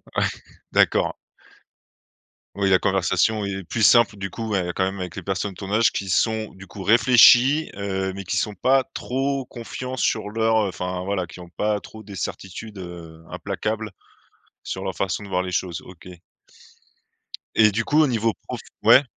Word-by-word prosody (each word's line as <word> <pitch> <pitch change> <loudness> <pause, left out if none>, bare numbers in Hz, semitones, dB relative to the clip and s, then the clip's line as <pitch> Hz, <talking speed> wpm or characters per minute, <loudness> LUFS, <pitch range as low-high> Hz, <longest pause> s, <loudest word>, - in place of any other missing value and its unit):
Ouais, - - +2 0.5
d'accord. - - +3 1.4
Ouais, 100 -1 +1
la 95 - +6
conversation 100 +3 +1
est 95 -1 -4
plus 100 +6 -4
simple 120 0 +6
du 100 -1 -5
coup, 110 +4 -5
ouais 90 -4 -1
quand - - +1
même 95 +1 -2
avec 90 -2 -5
les - - -6
personnes 95 +1 -2
de - - -18
ton 95 -1 -6
âge 115 +2 +4
qui 100 - -4
sont 110 +3 0
du 95 0 -13
coup 95 +1 -9
réfléchies, 125 - +6
heu, 95 -1 -2
mais 100 +1 -6
qui - - -1
sont 105 - 0
pas 130 +7 +3
trop 135 +1 -2
confiants 125 +2 -6
sur 110 -4 0
leur, 110 0 +2
heu, - - 0
enfin 90 -1 -4
voilà 95 -1 -1
qui 90 +1 -13
ont 90 -1 -11
pas 105 +3 -1
trop 110 +2 -12
des 100 -1 -11
certitudes, 95 +3 -6
heu, 85 -3 -9
implacables 110 0 -3 0.7
sur 95 - -5
leur 95 -1 -3
façon 100 +1 -2
de 100 - -10
voir 90 -1 +1
les 90 0 -4
choses, 90 -3 -2
OK. 90 -1 -14 1.5
Et 110 -1 +6
du 115 +3 -1
coup 150 +2 +3
au 155 - +4
niveau 115 -3 +1
prof? - - -5 0.2
Ouais 135 - +7
100 Hz, 185 wpm, -23 LUFS, 95-115 Hz, 1.5 s, Ouais